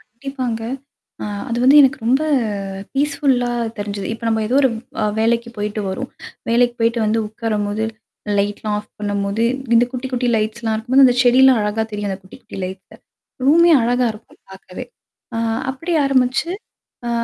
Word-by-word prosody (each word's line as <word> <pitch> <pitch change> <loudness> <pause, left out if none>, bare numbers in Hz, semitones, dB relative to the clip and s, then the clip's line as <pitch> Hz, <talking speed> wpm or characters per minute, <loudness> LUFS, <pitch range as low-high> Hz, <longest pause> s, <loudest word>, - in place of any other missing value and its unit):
கண்டிப்பாங்க. 245 -1 -5 0.6
ஆ - - -3 0.2
அது 235 0 -2
வந்து 270 +3 +7
எனக்கு 265 -1 +3
ரொம்ப 265 +5 +3 0.7
பீஸ்ஃபுல்லா 275 -3 +1 0.3
தெரிஞ்சுது. 205 -1 -4
இப்ப 230 - -9
நம்ம 220 -1 +1
ஏதோ 250 - 0
ஒரு 265 - +5 0.3
அ - - +2 0.2
வேலைக்கு 235 +1 +1
போயிட்டு 210 +1 -3
வரோம். 220 +8 -4 0.4
வேலைக்கு 240 +1 +3
போயிட்டு 230 +1 +2
வந்து 220 +2 +1
உக்காரும்போது. 215 -1 -2 0.5
லைட்லாம் 205 +1 -1
ஆஃப் 210 - -10
பண்ணும்போது 205 +1 -1 0.3
இந்த 230 +1 +6
குட்டி 255 0 -4
குட்டி 250 -1 -1
லைட்ஸ்லாம் 220 +1 -1
இருக்கும்போது, 255 +5 +4
அந்த 250 - +3
செடிலாம் 255 0 +6
அழகா 210 +2 -1
தெரியும் 205 -1 -3
அந்த 190 - -4
குட்டி 190 - -14
குட்டி - - -10
லைட்ல. 185 +1 -8 0.5
ரூமே 335 +4 +6
அழகா 245 +2 +2
இருக்கும் 215 +1 -16
பாக்கவே. 190 +4 -9 0.5
ஆ - - -1 0.3
அப்படி 330 +7 -5
ஆரம்பிச்சு, 270 +4 +1 0.6
அ - - -1
230 Hz, 155 wpm, -19 LUFS, 210-255 Hz, 0.7 s, வந்து